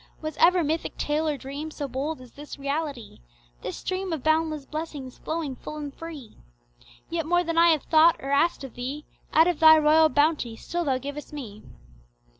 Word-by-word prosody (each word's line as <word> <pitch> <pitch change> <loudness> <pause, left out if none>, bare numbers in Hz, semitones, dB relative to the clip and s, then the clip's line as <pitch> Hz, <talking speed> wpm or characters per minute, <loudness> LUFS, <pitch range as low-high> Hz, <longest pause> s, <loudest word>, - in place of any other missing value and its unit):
Was 310 0 -5
ever 355 0 +5
mythic 315 +2 -2
tale 305 +2 0
or 295 -2 0
dream 280 +4 -6
so 295 -2 -5
bold 275 +3 -4
as 250 -2 -14
this 295 +1 -10
reality, 280 -4 -4 0.4
This - - -5
stream 375 0 -3
of 310 - -4
boundless 315 -2 +1
blessings 300 -5 -6
flowing 315 -4 -3
full 300 - -8
and 290 -2 -6
free? 310 -8 -10 0.7
Yet 330 -2 -2
more 350 +1 +3
than 330 -1 0
I 340 - +7
have 315 -3 +2
thought 325 +1 +5
or 275 - -5
asked 285 +2 +2
of 265 - -8
Thee 270 +5 -5 0.3
Out 320 +1 +6
of 350 -4 0
Thy 315 -1 +9
royal 310 +1 +5
bounty 290 -5 +1
still 345 +8 -4
Thou 265 -3 +1
givest 285 +3 -7
me. 220 -8 -8
305 Hz, 190 wpm, -26 LUFS, 275-320 Hz, 0.7 s, Thy